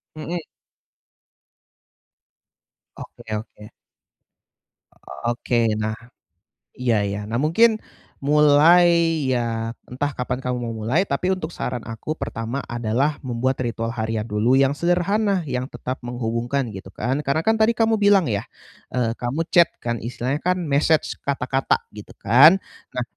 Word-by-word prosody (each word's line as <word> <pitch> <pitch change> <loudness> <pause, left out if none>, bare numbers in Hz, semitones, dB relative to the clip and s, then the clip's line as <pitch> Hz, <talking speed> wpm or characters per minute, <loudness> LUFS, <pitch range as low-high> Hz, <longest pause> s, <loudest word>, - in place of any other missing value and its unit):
Mhm. 165 +3 -4 2.6
Oke, 110 - -9
oke. 105 0 -9 1.6
Oke, 120 -1 +1
nah, 110 0 -2 0.8
iya, 120 -4 +1
iya. 100 +1 -3
Nah 115 - -1
mungkin 220 +9 +4 0.4
mulai 150 +4 +6 0.4
ya 115 -3 -1 0.2
entah 145 +3 -2
kapan 125 0 -3
kamu 125 -1 -1
mau 115 - -3
mulai, 135 - +2
tapi 180 +7 0
untuk 170 -3 -6
saran 125 -7 -4
aku 115 +7 -5
pertama 115 -1 -4
adalah 120 +5 -1
membuat 130 +1 -1
ritual 115 -1 -3
harian 110 -2 -2
dulu 110 +5 +2
yang 135 0 +4
sederhana, 185 +3 +1
yang 125 -1 -2
tetap 130 +1 -5
menghubungkan 120 +2 -2
gitu 95 -1 -9
kan. 130 +5 -1
Karena 140 +4 +1
kan 220 +4 +3
tadi 220 +1 +5
kamu 225 0 +2
bilang 200 -3 +5
ya, 105 -1 -1 0.5
eee, 125 -3 +1
kamu 140 +7 -2
chat 170 -2 +6
kan 120 -1 -2
istilahnya 125 +4 -2
kan 180 +1 +1
message 155 0 +1
kata-kata 135 -1 0 0.2
gitu 105 - -10
kan. 140 - +7 0.3
Nah 125 - -1
130 Hz, 130 wpm, -22 LUFS, 115-155 Hz, 2.6 s, kan